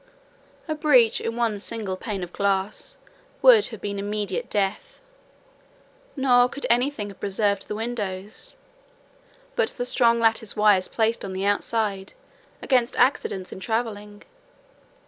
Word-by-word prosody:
A 310 - -1
breach 285 -7 +4
in 230 - -3
one 230 -3 0
single 210 -2 -4
pane 195 0 -5
of 175 - -8
glass 200 - -1 0.5
would 455 -4 +7
have 225 -4 -9
been 200 -1 -4
immediate 205 -1 -3
death: 200 0 -2 1.2
nor 250 -3 +4
could 280 - -6
any 245 +3 +3
thing 215 -8 -6
have 200 - -13
preserved 200 0 -1
the 210 - -4
windows, 215 - -5 1.0
but 470 -2 +2
the 245 - -2
strong 235 -2 +3
lattice 225 -2 +2
wires 210 -3 +4
placed 225 0 0
on 195 - -5
the 190 +1 -3
outside, 205 -1 -1 0.5
against 250 -2 +1
accidents 240 -7 +1
in - - -8
travelling. 210 -1 -4
215 Hz, 135 wpm, -24 LUFS, 200-245 Hz, 1.2 s, would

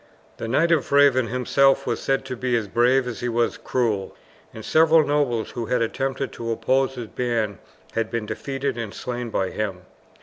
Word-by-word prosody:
The - - -5
Knight 160 +8 +2
of 160 -5 +2
the - - +1
Raven 135 -4 +5
himself 130 +3 +2
was 120 - -1
said 135 0 0
to 130 -1 -4
be 125 0 -1
as 110 -3 -3
brave 125 +5 +3
as 120 - -5
he 120 - -2
was 120 0 +1
cruel, 110 -7 -1 0.4
and 110 - -10
several 160 0 +5
nobles 140 -6 0
who 115 -2 -4
had 125 0 +1
attempted 135 +3 -2
to 115 0 -5
oppose 130 +4 +1
his 120 -2 -5
band 115 -4 -2 0.3
had 115 -1 -1
been 115 -2 -3
defeated 135 +1 -3
and 110 -3 -5
slain 125 -1 -4
by 95 -3 -1
him. 100 -4 -3
125 Hz, 195 wpm, -23 LUFS, 115-135 Hz, 0.4 s, Raven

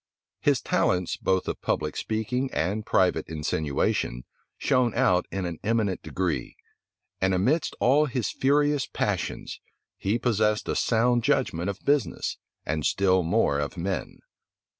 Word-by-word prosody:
His - - +2
talents, 90 -1 +1
both 95 -1 0
of - - -4
public 75 -1 -1
speaking 120 +5 -2
and 100 +6 -1
private 95 -5 +2
insinuation, 75 -5 -1 0.3
shone 125 -3 +1
out 90 0 +3
in 95 -1 -3
an 85 -2 -5
eminent 105 -3 0
degree; 90 -5 -2 0.7
and 95 0 +2
amidst 135 - +1
all 145 +5 +4
his 125 -6 -2
furious 145 0 +2
passions, - - -3 0.4
he 100 +4 +1
possessed 110 -3 +1
a - - -1
sound 120 +1 +2
judgment 125 - +1
of 100 - -6
business, 145 -4 0 0.3
and 75 +1 -1
still 95 +1 +3
more 85 -4 +2
of 75 +6 -3
men. 95 +2 -3
100 Hz, 135 wpm, -26 LUFS, 90-125 Hz, 0.7 s, all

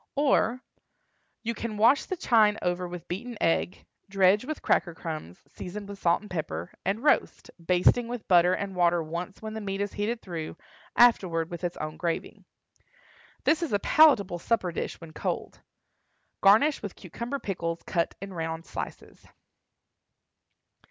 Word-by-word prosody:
Or, 260 -4 +2 0.8
You 230 0 -1
can 225 -2 -5
wash 235 +6 +5
the 370 - -4
chine 215 -7 +4
over 180 0 -1
with 175 -1 -8
beaten 225 +6 -5
egg, 165 +2 0 0.2
dredge 195 +3 +4
with 310 +1 -5
cracker 170 -3 +1
crumbs, 155 - -7
seasoned 200 +3 -8
with 200 -1 -8
salt 170 0 +2
and 210 - -12
pepper, 90 - -4
and 200 +6 -1
roast, 300 - +1
basting 180 +7 +3
with 240 -2 -6
butter 180 0 +5
and 195 -1 -4
water 175 -1 +3
once 170 +6 -6
when 220 0 -5
the 220 - -5
meat 195 -1 -3
is 200 -1 -2
heated 220 +3 -2
through, 165 -3 -6 0.4
afterward 175 -9 +4
with 175 +1 -7
its 175 0 -2
own 155 0 -5
gravy. 170 -2 -3 1.0
This 315 +2 +3
is 330 -9 -2
a - - +5
palatable 205 - +4
supper 185 -2 0
dish - - -4
when 165 -2 -11
cold. - - -4 0.8
Garnish 225 +10 +5
with 205 - -6
cucumber 235 - -5
pickles 170 -8 -4
cut 170 -2 -1
in 195 0 -7
round 165 -1 -4
slices. - - -8
195 Hz, 155 wpm, -27 LUFS, 170-225 Hz, 1.0 s, wash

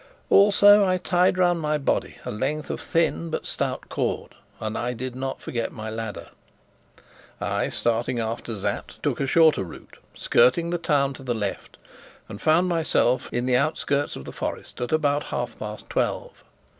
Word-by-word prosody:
Also 205 0 +7
I 185 -1 +2
tied 180 0 +2
round 175 -2 +3
my 150 0 +1
body 140 - -1
a - - -3
length 140 +8 -2
of - - -5
thin 165 0 0
but 160 - -3
stout - - -3
cord, - - -2 0.3
and 110 0 -4
I 125 +1 -2
did 125 +1 -5
not 130 +1 -4
forget 115 -2 -3
my 110 -1 -6
ladder. 110 -1 -6 1.1
I, - - -1
starting 120 +2 0
after 115 0 -3
Sapt, 95 - -4
took - - 0
a 140 - 0
shorter 155 - +4
route, 85 - -12 0.2
skirting 150 +8 +3
the 175 - -1
town 140 -4 +1
to - - -11
the 125 -3 -2
left, 105 -3 -4 0.5
and 105 -2 -9
found 165 +3 +4
myself 160 -7 +1
in 120 +1 -1
the 125 -1 +3
outskirts 145 0 0
of 65 - -8
the - - -7
forest - - -5
at 125 - -2
about 145 -2 +1
half 120 -1 -4
past 105 0 -7
twelve. - - -2
135 Hz, 170 wpm, -25 LUFS, 120-165 Hz, 1.1 s, Also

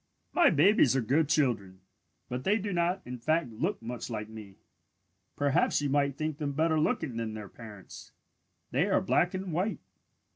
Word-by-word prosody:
"My 350 - +6
babies 155 - +4
are 135 - +2
good 140 +6 +1
children, 110 -11 0 0.5
but 125 +1 -4
they 205 +3 +3
do 205 -2 -3
not 175 +2 0
in 125 0 -7
fact 155 +1 0
look 160 - -2
much 120 +2 -5
like 105 -2 -4
me. 105 -3 -10 0.8
Perhaps 145 -1 +2
you 145 -1 -1
might 140 -1 +1
think 155 -1 -3
them 145 -2 -2
better 160 +2 +2
looking 150 -4 -1
than 110 -2 -3
their 105 -2 -7
parents. 105 -5 -12 0.6
They 145 +9 +2
are - - +4
black 180 -1 +1
and 185 -2 -4
white. 185 +7 0
145 Hz, 175 wpm, -29 LUFS, 115-170 Hz, 0.8 s, My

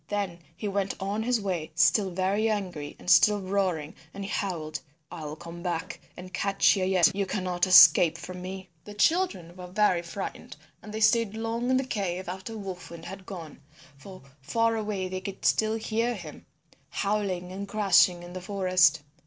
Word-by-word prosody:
Then 200 -4 -3 0.2
he 210 - -4
went 195 -1 -1
on 200 +2 -2
his 240 +1 +1
way 180 -6 -3
still 170 +4 +4
very 190 +5 0
angry 180 -9 -3
and - - -15
still 205 +3 +6
roaring, 185 -5 -1 0.2
and 200 - -5
he 200 - -6
howled, 160 -6 -3 0.3
"I 165 -3 -7
will 150 +1 -5
come 170 +1 -10
back 175 0 -4 0.2
and 185 +1 -10
catch 195 +1 +3
you 190 - -1
yet. 185 -2 +4
You 200 -1 -1
cannot 185 -2 -1
escape 175 -2 +8
from 180 +2 -8
me." 190 +1 -7
The 210 - -10
children 205 - +1
were 180 -1 -9
very 185 -1 +2
frightened 175 +3 -7 0.3
and 215 - -10
they 220 +1 -5
stayed 220 -1 +3
long 230 +2 -2
in 260 - +3
the 265 - +1
cave 190 -7 -3
after 190 +5 -6
Wolf 190 -3 -7
Wind 170 0 -10
had 190 0 -9
gone, 165 -6 -9 0.3
for 185 +5 -13 0.2
far 230 - +1
away 210 -4 -2
they 185 0 -5
could 195 0 -7
still 220 0 +2
hear 230 +2 -1
him 165 -7 -10 0.4
howling 195 -3 -2
and 200 +2 -6
crashing 190 -4 +3
in 175 0 -10
the 185 - -6
forest. 185 -4 +2
190 Hz, 185 wpm, -27 LUFS, 175-210 Hz, 0.4 s, escape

